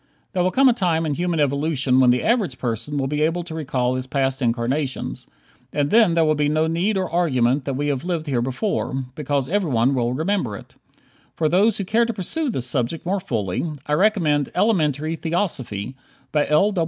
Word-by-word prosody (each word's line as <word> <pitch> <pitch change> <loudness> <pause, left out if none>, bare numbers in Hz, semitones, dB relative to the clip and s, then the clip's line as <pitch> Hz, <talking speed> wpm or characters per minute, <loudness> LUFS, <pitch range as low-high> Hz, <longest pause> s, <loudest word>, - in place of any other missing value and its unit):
There 180 - +1
will 185 - +3
come 270 +7 +4
a 250 - +6
time 175 -7 0
in 150 - -1
human 175 +1 -1
evolution 140 -2 +1
when 130 -1 +5
the 125 0 +2
average 215 - +1
person 125 +5 -3
will 135 - 0
be 150 +2 -1
able 165 +3 +1
to 165 -1 -8
recall 130 -5 -1
his 130 0 -3
past 135 0 -1
incarnations, 125 +4 -2 0.4
and 145 -1 0
then 220 -7 +5
there 165 -1 +4
will 155 - +3
be 150 -1 +1
no 155 +1 +2
need 175 +6 0
or 185 -1 0
argument 135 -6 +1
that 135 - -2
we 145 +2 -1
have 140 -2 -2
lived 170 -3 -2
here 130 -6 0
before, 130 - -2
because 140 -2 -1
everyone 140 - +1
will 120 -2 0
remember 160 - -1
it. - - -14 0.6
For 160 - +1
those 200 +7 +3
who 195 - -3
care 225 +5 +2
to 235 - -2
pursue 275 - -2
this 130 - -2
subject 125 +5 -2
more 195 +3 0
fully, 110 - -2 0.2
I 150 - -2
recommend 160 -6 +2
"Elementary 155 - +1
Theosophy," 135 - -3 0.4
by 150 -1 +1
L. 195 +8 +3
150 Hz, 200 wpm, -22 LUFS, 130-180 Hz, 0.6 s, a